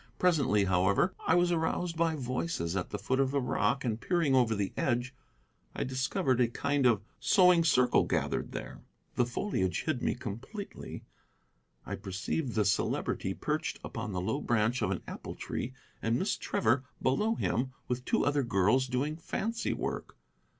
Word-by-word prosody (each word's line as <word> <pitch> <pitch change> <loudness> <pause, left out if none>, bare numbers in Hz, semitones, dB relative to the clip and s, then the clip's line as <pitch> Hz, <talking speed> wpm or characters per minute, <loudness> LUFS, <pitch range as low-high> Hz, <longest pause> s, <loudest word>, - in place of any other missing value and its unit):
Presently, 140 - +3
however, 95 - +3
I 165 - +5
was 175 0 +3
aroused 170 +1 0
by 165 -1 +1
voices 125 - -2
at 90 - -2
the 105 - -3
foot 130 +5 -1
of 135 -1 +3
the 140 +1 +1
rock, 135 +1 0
and 115 -1 -1
peering 170 -6 +1
over 120 -4 +4
the 100 -2 -2
edge 125 0 0 0.6
I - - -1
discovered 130 - 0
a 120 - +5
kind 140 +2 +1
of 110 -4 +3 0.2
sewing 180 -3 +5
circle 125 -6 +4
gathered - - -1
there. - - -7 0.3
The 120 - +2
foliage 120 - -1
hid 155 -6 -1
me - - +1
completely. 130 - -7 0.8
I - - -4
perceived 110 - -3
the 105 -2 +2
Celebrity 100 +1 0
perched - - -2
upon 115 -1 -5
the 90 -2 -2
low 140 +10 -1
branch 115 0 +1
of - - +1
an - - -2
apple - - -7
tree, 130 +2 -4 0.3
and 115 +2 +1
Miss 190 - 0
Trevor 125 +4 +1 0.2
below 210 +13 +1
him, 130 - 0 0.2
with 125 0 -2
two - - +1
other 145 0 +2
girls, 120 +3 +2
doing 135 +5 -1
fancy 225 +7 -2
work. - - -4
130 Hz, 165 wpm, -31 LUFS, 115-160 Hz, 0.8 s, I